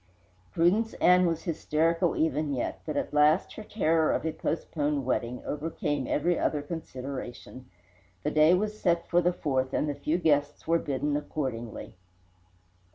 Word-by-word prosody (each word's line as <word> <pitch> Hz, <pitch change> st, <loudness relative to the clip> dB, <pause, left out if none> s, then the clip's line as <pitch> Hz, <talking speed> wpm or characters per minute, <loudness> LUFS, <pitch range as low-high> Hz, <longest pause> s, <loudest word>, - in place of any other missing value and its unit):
Prudence 200 Hz, -, +2 dB
Ann 180 Hz, 0 st, +5 dB
was 165 Hz, -1 st, -2 dB
hysterical 165 Hz, +1 st, +1 dB
even 150 Hz, -2 st, 0 dB
yet, 125 Hz, -, -3 dB
but 150 Hz, -2 st, -2 dB
at -, -, -2 dB
last 150 Hz, +4 st, +3 dB
her 215 Hz, -, -8 dB
terror 165 Hz, -7 st, +1 dB
of -, -, -2 dB
a 160 Hz, -, 0 dB
postponed 150 Hz, -4 st, -2 dB
wedding 125 Hz, -1 st, -2 dB
overcame 150 Hz, -1 st, -2 dB
every 170 Hz, +3 st, +1 dB
other 150 Hz, -2 st, 0 dB
consideration. 130 Hz, -4 st, -7 dB, 0.5 s
The -, -, 0 dB
day 155 Hz, +3 st, +5 dB
was 210 Hz, +3 st, -2 dB
set 170 Hz, -2 st, +1 dB
for 175 Hz, 0 st, +3 dB
the 175 Hz, -, +3 dB
4th, 130 Hz, -6 st, -1 dB
and -, -, 0 dB
the 145 Hz, -, -1 dB
few 150 Hz, +3 st, -1 dB
guests 145 Hz, -4 st, +1 dB
were 165 Hz, +1 st, +3 dB
bidden 145 Hz, 0 st, -1 dB
accordingly. 130 Hz, -6 st, -4 dB
155 Hz, 155 wpm, -28 LUFS, 145-170 Hz, 0.5 s, Ann